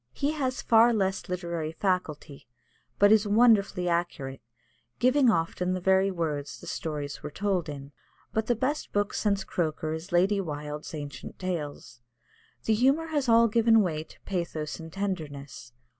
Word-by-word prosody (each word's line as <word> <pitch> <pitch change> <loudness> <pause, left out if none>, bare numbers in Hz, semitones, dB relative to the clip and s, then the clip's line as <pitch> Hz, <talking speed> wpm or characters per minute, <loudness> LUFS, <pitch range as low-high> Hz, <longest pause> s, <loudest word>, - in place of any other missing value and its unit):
He 285 +1 0
has 265 -4 -2
far 230 +1 +6
less 195 -3 -1
literary 170 -3 -3
faculty, 160 -6 -2 0.5
but 205 +1 +6
is 215 -1 +5
wonderfully 205 -4 +4
accurate, 170 -6 -2 0.6
giving 255 +1 +4
often 180 0 0
the 185 - -2
very 190 +1 +3
words 150 -6 -3
the - - -12
stories 150 -3 -4
were 150 - -5
told 185 0 -1
in. 140 -1 -8 0.4
But 220 0 0
the 240 - +2
best 265 +6 -2
book 205 0 0
since 200 -2 0
Croker 155 -2 -2
is 160 +4 -7
Lady 190 +3 +3
Wilde's 150 -1 -6
Ancient 145 -4 -8
Legends. 150 -8 -5 0.6
The 220 - +2
humour 270 +8 +2
has 290 -5 0
all 230 0 +6
given 225 0 +4
way 160 -5 -1
to - - -18
pathos 170 -5 -4
and 160 0 -9
tenderness. 145 - -5
180 Hz, 155 wpm, -28 LUFS, 155-220 Hz, 0.6 s, far